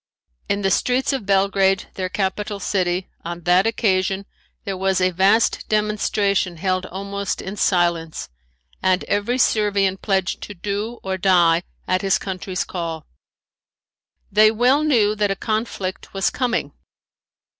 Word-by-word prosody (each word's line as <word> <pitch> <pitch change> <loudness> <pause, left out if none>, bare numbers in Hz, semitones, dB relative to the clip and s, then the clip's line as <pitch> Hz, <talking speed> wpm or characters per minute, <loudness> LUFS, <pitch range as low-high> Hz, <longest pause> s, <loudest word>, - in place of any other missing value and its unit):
In 200 0 0
the 195 - +2
streets 255 +6 +1
of 255 -7 -4
Belgrade, 195 -1 +2
their 185 -1 -3
capital 205 +2 -2
city, 180 -2 -1 0.2
on 170 +1 -6
that 180 +4 +3
occasion 195 -3 0 0.4
there 195 - -3
was 190 0 +1
a 185 0 +2
vast 195 +5 +2
demonstration 210 -3 0
held 185 +2 -1
almost 200 +1 -4
in 190 +2 -6
silence 170 -4 0 0.5
and 185 0 +2
every 205 +5 0
Servian 205 -5 +2
pledged 190 -1 -1
to 205 - -8
do 205 +5 -3
or 190 -1 -3
die 175 -3 +4 0.3
at 185 0 +1
his 195 -1 +2
country's 185 -1 -4
call. 165 -3 -5 1.3
They 215 +2 +6
well 250 +7 +3
knew 230 -9 +3
that 210 -1 0
a 195 - 0
conflict 215 -4 -3
was 195 - +1
coming. 245 -2 -1
195 Hz, 135 wpm, -21 LUFS, 185-210 Hz, 1.3 s, They